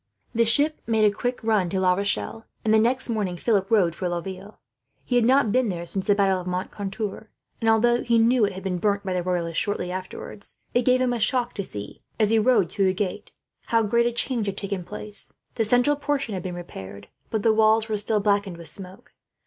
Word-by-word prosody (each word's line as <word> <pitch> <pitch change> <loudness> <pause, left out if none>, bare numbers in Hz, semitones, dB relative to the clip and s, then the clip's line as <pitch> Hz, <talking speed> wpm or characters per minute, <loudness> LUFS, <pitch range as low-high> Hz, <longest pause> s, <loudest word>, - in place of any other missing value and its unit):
The 230 0 +3
ship 295 +7 +2
made 220 -2 +3
a 205 - +4
quick 245 +2 -3
run 215 -5 +2
to 190 - -1
La 185 -1 +4
Rochelle, 200 +3 -2 0.2
and 215 - +3
the 220 - +6
next 250 +4 +1
morning 205 -6 -2
Philip 200 0 +1
rode 190 -7 +3
for 180 +1 -3
Laville. 190 +4 -6 0.5
He 250 - -1
had 240 -2 +4
not 260 -3 +4
been 255 0 +2
there 170 -2 -4
since 190 +2 -3
the 205 - +4
battle 195 -2 +2
of 180 - -9
Moncontour; 200 +3 -4 0.3
and 225 - +2
although 240 +2 +3
he 235 0 +2
knew 235 +2 +4
that 210 - +5
it - - -9
had 190 0 -8
been 180 -2 -2
burnt 200 +1 0
by 190 - -1
the 180 - 0
Royalists, 175 -2 -1
shortly 190 -3 -2
afterwards, 185 +2 -7 0.2
it 245 -1 +2
gave 255 0 +4
him 250 -1 +1
a 240 - -2
shock 245 +2 0
to 200 - -3
see, 105 - -7 0.2
as 215 -1 +3
he 225 - +4
rode 215 -7 +3
through 195 0 +1
the 185 0 +2
gate, 195 -1 -3 0.4
how 230 -2 +3
great 235 +3 +2
a - - 0
change 235 -2 -2
had 195 0 -3
taken 200 -2 -3
place. 210 +2 -4 0.2
The 225 - 0
central 245 +6 +3
portion 285 -5 -2
had 185 - -3
been 180 0 -5
repaired, 100 - -9 0.2
but 220 -2 -2
the 225 - +4
walls 220 0 +4
were 215 - -1
still 210 +1 +2
blackened 200 -3 0
with 170 -2 -7
smoke. 185 -1 -8
210 Hz, 230 wpm, -24 LUFS, 185-230 Hz, 0.5 s, the